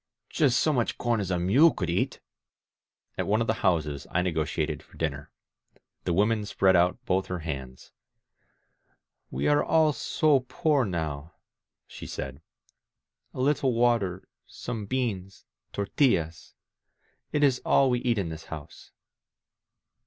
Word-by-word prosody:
•. -, -, -24 dB
• -, -, -14 dB
Just 135 Hz, -5 st, +3 dB
so 155 Hz, -, +2 dB
much 120 Hz, -4 st, 0 dB
com 120 Hz, -2 st, 0 dB
as 100 Hz, -3 st, -3 dB
a 90 Hz, -, 0 dB
mule 120 Hz, -, +5 dB
could -, -, -3 dB
eat... -, -, -1 dB, 0.5 s
!" -, -, -52 dB
At -, -, -1 dB
one 105 Hz, +2 st, +2 dB
of 115 Hz, -, +1 dB
the 110 Hz, -, +1 dB
houses 75 Hz, -6 st, 0 dB
I 90 Hz, -, 0 dB
negotiated 80 Hz, -3 st, -2 dB
for -, -, -19 dB
dinner. 75 Hz, -3 st, -3 dB, 0.8 s
The 85 Hz, -, 0 dB
woman 105 Hz, +4 st, +2 dB
spread 95 Hz, -2 st, +3 dB
out 90 Hz, +1 st, +3 dB
both 95 Hz, +1 st, 0 dB
her 90 Hz, -, -3 dB
hands. 65 Hz, -6 st, -7 dB, 1.4 s
"We 65 Hz, +2 st, -2 dB
are 145 Hz, 0 st, +3 dB
all 160 Hz, -2 st, +3 dB
so 150 Hz, 0 st, +2 dB
poor 150 Hz, -6 st, +2 dB
now," 80 Hz, -4 st, -4 dB, 0.5 s
she -, -, -10 dB
said. 70 Hz, +2 st, -6 dB, 0.9 s
A -, -, -6 dB
little 135 Hz, -1 st, +2 dB
water, 115 Hz, -6 st, +1 dB, 0.2 s
some 115 Hz, -4 st, -6 dB
beans 100 Hz, -6 st, -3 dB
— -, -, -56 dB
tortillas.... 100 Hz, -, 0 dB, 0.8 s
It 145 Hz, -, +1 dB
is 135 Hz, -3 st, +3 dB
all 135 Hz, -2 st, +4 dB
we 125 Hz, -, +1 dB
eat 120 Hz, -2 st, 0 dB
in 95 Hz, -5 st, -1 dB
this 80 Hz, 0 st, -8 dB
house. 75 Hz, -3 st, -10 dB
95 Hz, 155 wpm, -27 LUFS, 80-125 Hz, 1.4 s, mule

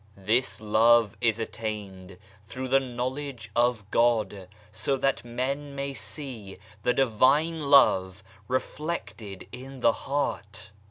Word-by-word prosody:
This 115 Hz, +7 st, 0 dB
love 110 Hz, 0 st, +4 dB
is 115 Hz, -3 st, +2 dB
attained 105 Hz, -5 st, -6 dB, 0.3 s
through 130 Hz, +3 st, -5 dB
the 135 Hz, +1 st, +5 dB
knowledge 125 Hz, -2 st, -5 dB
of 120 Hz, -3 st, +2 dB
God, 110 Hz, -5 st, +1 dB, 0.2 s
so 110 Hz, +6 st, -1 dB
that 135 Hz, +1 st, 0 dB
men 140 Hz, +3 st, -3 dB
see 110 Hz, -3 st, -7 dB, 0.2 s
the 125 Hz, -, +2 dB
Divine 135 Hz, +6 st, +3 dB
Love 95 Hz, -8 st, +5 dB, 0.2 s
reflected 130 Hz, -, -4 dB
in 130 Hz, +1 st, -9 dB
the -, -, +5 dB
heart. 105 Hz, -8 st, -3 dB
120 Hz, 110 wpm, -27 LUFS, 105-135 Hz, 0.3 s, the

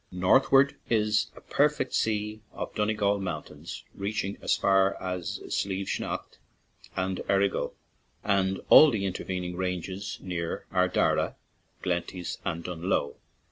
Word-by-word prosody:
Northward 135 Hz, +10 st, +4 dB
is 105 Hz, -2 st, +2 dB
a -, -, -13 dB
perfect 150 Hz, -2 st, +1 dB
sea 105 Hz, 0 st, 0 dB
of -, -, -5 dB
Donegal 105 Hz, -1 st, +1 dB
mountains, 90 Hz, -6 st, -6 dB
reaching 100 Hz, 0 st, -2 dB
as -, -, +2 dB
far 95 Hz, 0 st, +3 dB
as 90 Hz, -2 st, -4 dB
Slieve 95 Hz, 0 st, -1 dB
Snaght -, -, -4 dB, 0.6 s
and 95 Hz, 0 st, -1 dB
Errigal, 100 Hz, 0 st, +1 dB, 0.5 s
with 95 Hz, -2 st, +1 dB
all 155 Hz, -, +10 dB
the 105 Hz, -6 st, -1 dB
inter 95 Hz, -1 st, -3 dB
vening 90 Hz, -1 st, -3 dB
ranges 95 Hz, +2 st, -3 dB
near 85 Hz, -3 st, -4 dB
Ardara, 90 Hz, -1 st, +2 dB, 0.5 s
Glenties, 90 Hz, 0 st, -2 dB
and 85 Hz, +1 st, -3 dB
Dunloe. 85 Hz, -4 st, -1 dB
95 Hz, 120 wpm, -28 LUFS, 90-105 Hz, 0.6 s, all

